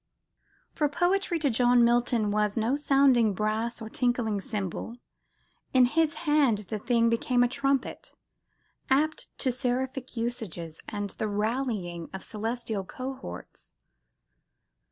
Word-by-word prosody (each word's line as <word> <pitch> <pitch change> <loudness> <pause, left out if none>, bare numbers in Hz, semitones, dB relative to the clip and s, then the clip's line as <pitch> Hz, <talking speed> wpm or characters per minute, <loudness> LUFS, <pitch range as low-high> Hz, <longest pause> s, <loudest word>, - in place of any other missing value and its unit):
For 295 -2 +1
poetry, 355 +3 +1
to 295 -4 +1
John 245 +1 +4
Milton, 235 -3 +2
was 210 0 0
no 230 +4 +2
sounding 270 -7 +4
brass 215 +3 -1
or - - -6
tinkling 230 -3 0
cymbal; 210 +3 -4 0.8
in 255 -1 +7
his 315 +4 +1
hand 295 -7 +4
"the 215 - -2
thing 230 +1 +2
became 245 +2 +2
a - - +4
trumpet," 275 +1 -2 0.7
apt 300 +4 +1
to 260 - +1
seraphic 255 +1 -3
usages 200 -9 -4
and 205 -2 -4
the 215 - -3
rallying 210 -5 -2
of 190 - -6
celestial 220 -1 -3
cohorts. 255 - -8
240 Hz, 120 wpm, -28 LUFS, 215-265 Hz, 0.8 s, in